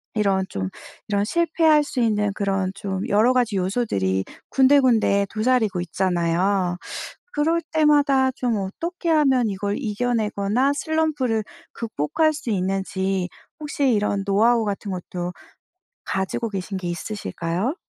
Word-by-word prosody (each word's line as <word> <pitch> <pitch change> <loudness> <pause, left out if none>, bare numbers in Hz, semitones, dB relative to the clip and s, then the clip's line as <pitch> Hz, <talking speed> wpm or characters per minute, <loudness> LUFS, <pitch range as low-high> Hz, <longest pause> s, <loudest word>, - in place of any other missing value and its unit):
이런 195 -3 +2
좀 95 -1 -3 0.4
이런 205 -1 +1
실패할 320 +1 +3
수 285 -2 -4
있는 210 -3 +2
그런 195 -2 -1
좀 195 -1 -4
여러 220 +5 +4
가지 240 -5 +1
요소들이 180 - 0 0.3
군데군데 255 -7 +4
도사리고 220 -4 +1
있잖아요. 180 +1 0 0.6
그럴 325 +3 +1
때마다 290 -4 +4
좀 250 -3 -1
어떻게 335 - -4
하면 270 -7 +3
이걸 200 +1 -2
이겨내거나 225 +1 0
슬럼프를 285 -7 0 0.3
극복할 230 - 0
수 290 -5 -6
있는지 190 -1 -1 0.3
혹시 290 -3 0
이런 205 -2 +1
노하우 225 +3 +3
같은 205 0 -3
것도 180 -1 -5 0.7
가지고 200 +4 -2
계신 195 -1 -4
게 185 -2 -5
있으실까요? 185 - -3
210 Hz, 285 characters per minute, -23 LUFS, 190-265 Hz, 0.7 s, 여러